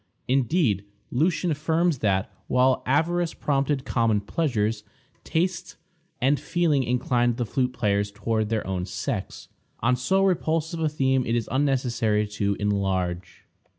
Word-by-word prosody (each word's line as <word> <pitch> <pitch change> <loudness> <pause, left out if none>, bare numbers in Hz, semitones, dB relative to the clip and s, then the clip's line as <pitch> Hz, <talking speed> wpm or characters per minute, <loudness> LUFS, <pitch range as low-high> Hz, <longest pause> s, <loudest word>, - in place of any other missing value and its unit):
Indeed, 130 - +2 0.3
Lucian 165 +5 +1
affirms 160 0 +1
that, 95 -3 0 0.2
while 130 +1 +3
avarice 165 +5 +1
prompted 140 -1 0
common 115 -3 +2
pleasures, 110 -4 -1 0.4
taste 175 +3 -1 0.4
and 135 +3 +2
feeling 165 -5 +1
inclined 120 -1 +1
the 120 - -1
flute 125 +3 -1
payers 100 -2 +1
toward 110 +1 -1
their 110 -2 -1
own 95 -1 -3
sex. - - -4 0.3
On 125 +2 +3
so 190 +11 +1
repulsive 165 -2 0
a 160 -1 +1
theme 135 -3 +1
it 115 - +1
is 115 -2 -1
unnecessary 125 -6 +1
to 100 -1 -1
enlarge. 95 -3 -2
125 Hz, 130 wpm, -25 LUFS, 105-150 Hz, 0.4 s, while